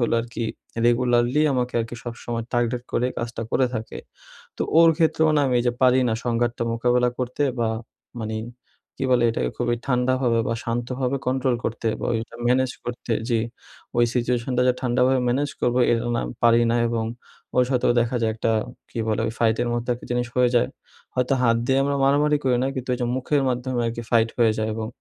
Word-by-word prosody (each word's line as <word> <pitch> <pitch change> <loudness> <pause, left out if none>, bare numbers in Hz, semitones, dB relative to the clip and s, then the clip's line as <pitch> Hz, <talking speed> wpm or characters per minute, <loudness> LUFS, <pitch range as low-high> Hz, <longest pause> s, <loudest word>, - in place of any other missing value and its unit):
হল 120 - +1
আর 115 - -6
কি 115 - -2 0.4
রেগুলারলি 120 +3 +3
আমাকে 125 -1 -1
আর - - -1
কি 120 - -6
সবসময় 115 -1 -5
টার্গেট 120 0 0
করে 125 - +1
কাজটা 115 -1 -4
করে 130 0 +3
থাকে। 110 0 -5 0.6
তো - - -1 0.2
ওর 165 -1 +7
ক্ষেত্রেও 160 -1 +3
না - - +4
আমি 125 - +1
এইযে 120 0 +1
পারি 130 0 +5
না 110 - +1
সংঘাতটা 120 0 0
মোকাবিলা 125 +1 +2
করতে 125 +3 -2 0.2
বা 115 -1 +1 0.5
মানি 110 0 -3 0.6
কি 135 - -2
বলে 120 -1 +4
এটাকে? 60 - -1
খুবই 120 0 0
ঠান্ডাভাবে 125 -2 +1
বা 115 - 0
শান্তভাবে 125 +3 -2
কন্ট্রোল 130 -1 +1
করতে 115 0 -2
বা - - -2
ওইটা 115 +1 -4
ম্যানেজ 130 +1 +2
করতে 120 -1 -4 0.2
যে 115 - +3 0.6
ওই 120 - +6
সিচুয়েশানটা 125 +1 0
যে - - +5
ঠান্ডাভাবে 130 +1 +2
ম্যানেজ 140 +3 0
করবো, 125 +1 +1
এটা 115 0 0
না - - 0 0.2
পারি 120 0 +5
না 120 - +2
এবং 115 -1 -1 0.5
ওর 125 - +5
সাথেও 125 -2 +2
দেখা 120 +1 0
যায় 110 - +2
একটা 115 0 0 0.4
কী 115 - -6
বলে? 110 - 0
ওই 115 - -2
ফাইটের 115 +1 +2
মধ্যে 120 +1 -2
একটা 120 - -12
জিনিস 120 0 0
হয়ে 125 -1 +4
যায় 120 - +3 0.5
হয়তো 125 +2 +1
হাত 115 -2 +4
দিয়ে 135 +1 +3
আমরা 140 0 0
মারামারি 145 +2 +3
করি 125 -2 +3
না - - +1
কিন্তু 130 -1 -5
ওই - - -6
যে 120 - 0
মুখের 140 +2 +1
মাধ্যমে 125 0 -1
আর 115 - -1
কি 120 - -4
ফাইট 115 -1 +3
হয়ে 115 -2 +4
যায় 110 0 0
এবং 110 -1 -3
120 Hz, 200 wpm, -23 LUFS, 115-130 Hz, 0.6 s, ওর